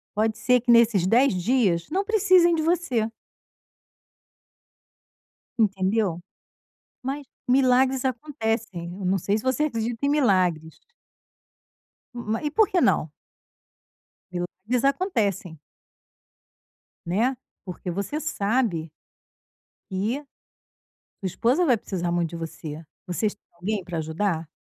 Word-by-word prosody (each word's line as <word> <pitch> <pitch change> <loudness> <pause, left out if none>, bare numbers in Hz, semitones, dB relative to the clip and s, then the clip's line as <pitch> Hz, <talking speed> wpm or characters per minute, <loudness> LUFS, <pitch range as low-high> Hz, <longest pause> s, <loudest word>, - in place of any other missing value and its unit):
Pode 220 +1 +1
ser 250 0 +3
que 240 0 +2
nesses 230 -6 +5
10 245 +6 +4
dias 185 -3 +1
não 385 +4 +1
precisem 370 -5 +4
de 320 - 0
você. 315 -9 +1 2.5
Entendeu? 195 -3 +1 0.8
Mas 275 +2 -4 0.2
milagres 260 0 +3
acontecem. 225 - -3
Eu 195 - -4
não 190 +2 +2
sei 200 +4 0
se 220 - -6
você 260 +3 +1
acredita 230 -1 -2
em 280 - +2
milagres. 185 - +1 1.4
Ma 225 -2 -2
e 295 - -1
por 435 +5 +4
que 365 - +2
não? 155 - +2 1.6
Eles 250 +1 +1
acontecem. 230 - 0 1.5
Né, 230 +9 +1 0.3
porque 180 0 -6
você 200 - -3
sabe 210 - 0 1.0
e 215 +10 -1 1.0
sua - - 0
esposa 245 - +1
vai 250 -7 +4
precisar 175 -4 -3
muito 170 -1 0
de - - -6
você. 160 -1 -7 0.2
Vocês 200 +4 -1
têm 205 - -52
alguém 195 +3 -3
para 175 -2 -5
ajudar? 160 +1 -1
220 Hz, 110 wpm, -25 LUFS, 180-265 Hz, 2.5 s, nesses